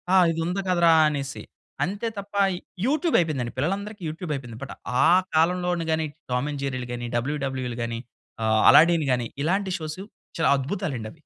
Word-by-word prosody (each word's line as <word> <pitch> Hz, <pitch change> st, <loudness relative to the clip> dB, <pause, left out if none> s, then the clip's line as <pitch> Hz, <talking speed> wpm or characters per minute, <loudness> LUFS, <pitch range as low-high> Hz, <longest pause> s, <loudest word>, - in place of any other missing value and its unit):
ఆహ్, 180 Hz, -2 st, +7 dB
"ఇది 165 Hz, 0 st, -2 dB
ఉంది 180 Hz, +3 st, -1 dB
కదరా!" 170 Hz, -2 st, +4 dB, 0.2 s
అనేసి. 140 Hz, -2 st, -4 dB, 0.4 s
అంతే 205 Hz, +5 st, -2 dB
తప్ప 200 Hz, +1 st, -7 dB, 0.5 s
యూట్యూబ్ 310 Hz, +4 st, +1 dB
అయిపోయిందండి, 135 Hz, -8 st, -1 dB
పిల్లలందరికీ 200 Hz, +7 st, -2 dB
యూట్యూబ్ 160 Hz, 0 st, -6 dB
అయిపోయింది. 120 Hz, -4 st, -8 dB
బట్ 135 Hz, -, -7 dB, 0.3 s
ఆ -, -, +6 dB, 0.3 s
కాలంలోని 175 Hz, +1 st, +2 dB
గాని 160 Hz, 0 st, +1 dB, 0.3 s
టామ్ 125 Hz, +4 st, 0 dB
అండ్ 145 Hz, -, -5 dB
జెర్రీలు 130 Hz, -2 st, -3 dB
గాని, 120 Hz, 0 st, -4 dB
డబల్యూడబల్యూఈలు 130 Hz, -2 st, -2 dB
గాని, 115 Hz, 0 st, -3 dB, 0.4 s
ఆహ్, 110 Hz, 0 st, +3 dB
అలాడిన్ 165 Hz, -1 st, +6 dB
గాని 120 Hz, -2 st, -1 dB, 0.2 s
ఇలాంటి 190 Hz, +3 st, 0 dB
షోస్ 155 Hz, +4 st, -6 dB, 0.4 s
చాలా 150 Hz, -, +4 dB
అద్భుతాలండవి. 135 Hz, -, -4 dB
155 Hz, 155 wpm, -25 LUFS, 130-180 Hz, 0.5 s, ఆహ్